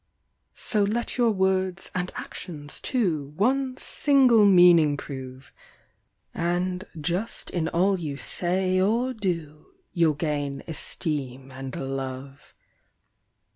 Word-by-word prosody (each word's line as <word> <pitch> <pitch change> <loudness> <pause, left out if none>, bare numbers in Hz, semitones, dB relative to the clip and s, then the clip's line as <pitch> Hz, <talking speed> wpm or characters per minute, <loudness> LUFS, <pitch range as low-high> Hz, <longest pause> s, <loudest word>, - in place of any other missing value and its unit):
So 215 - +1
let 215 +4 -1
your 240 -2 +3
words 190 -2 0
and 180 0 -2
actions, 150 -5 -7
too, 160 - -1
one 260 +5 +1
single 260 -9 +4
meaning 175 -6 +6
prove, 130 -1 -9 0.8
And 180 +2 -1 0.2
just 175 +8 -2
in 165 -3 -1
all 185 +3 +1
you 150 -4 -4
say 185 +4 +1
or 235 +6 +1
do, 170 -8 -4 0.3
you'll 165 -3 +3
gain 145 -2 -3
esteem 135 -5 -4
and 130 0 -7
love. 135 0 -6
175 Hz, 105 wpm, -25 LUFS, 145-195 Hz, 0.8 s, meaning